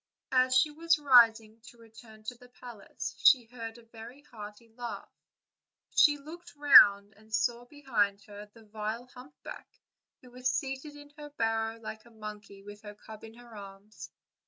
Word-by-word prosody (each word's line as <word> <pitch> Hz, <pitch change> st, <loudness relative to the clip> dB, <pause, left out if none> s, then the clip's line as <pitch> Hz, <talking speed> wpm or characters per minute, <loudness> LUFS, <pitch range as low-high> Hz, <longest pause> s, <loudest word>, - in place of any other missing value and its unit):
As 255 Hz, 0 st, +2 dB
she 300 Hz, +4 st, +3 dB
was 330 Hz, +2 st, +1 dB
rising 230 Hz, -5 st, +4 dB
to 240 Hz, -, -15 dB
return 225 Hz, -1 st, -17 dB
to 215 Hz, -, -6 dB
the 245 Hz, +1 st, -19 dB
palace 240 Hz, -4 st, -9 dB
she 250 Hz, -4 st, +5 dB
heard 230 Hz, -1 st, -9 dB
a 235 Hz, -, -17 dB
very 230 Hz, +4 st, -13 dB
hearty 210 Hz, -2 st, -12 dB
laugh: 235 Hz, +1 st, -8 dB, 0.8 s
she 295 Hz, -1 st, +5 dB
looked 340 Hz, +4 st, -13 dB
round 205 Hz, -8 st, +7 dB
and 215 Hz, +1 st, -22 dB
saw 240 Hz, +2 st, -1 dB
behind 210 Hz, -8 st, -2 dB
her 205 Hz, +1 st, -12 dB
the 225 Hz, 0 st, -19 dB
vile 215 Hz, +3 st, -6 dB
humpback, 260 Hz, +3 st, -12 dB, 0.5 s
who 250 Hz, -, -16 dB
was 250 Hz, +1 st, -2 dB
seated 270 Hz, +2 st, -5 dB
in 290 Hz, 0 st, -14 dB
her 295 Hz, 0 st, -9 dB
barrow 225 Hz, -4 st, -2 dB
like 220 Hz, -1 st, -9 dB
a -, -, -17 dB
monkey, 210 Hz, -3 st, -11 dB
with 205 Hz, 0 st, -12 dB
her 210 Hz, -1 st, -11 dB
cub 215 Hz, +1 st, -13 dB
in 225 Hz, 0 st, -12 dB
her 240 Hz, -1 st, -15 dB
arms. 200 Hz, +1 st, -12 dB
230 Hz, 165 wpm, -29 LUFS, 215-255 Hz, 0.8 s, round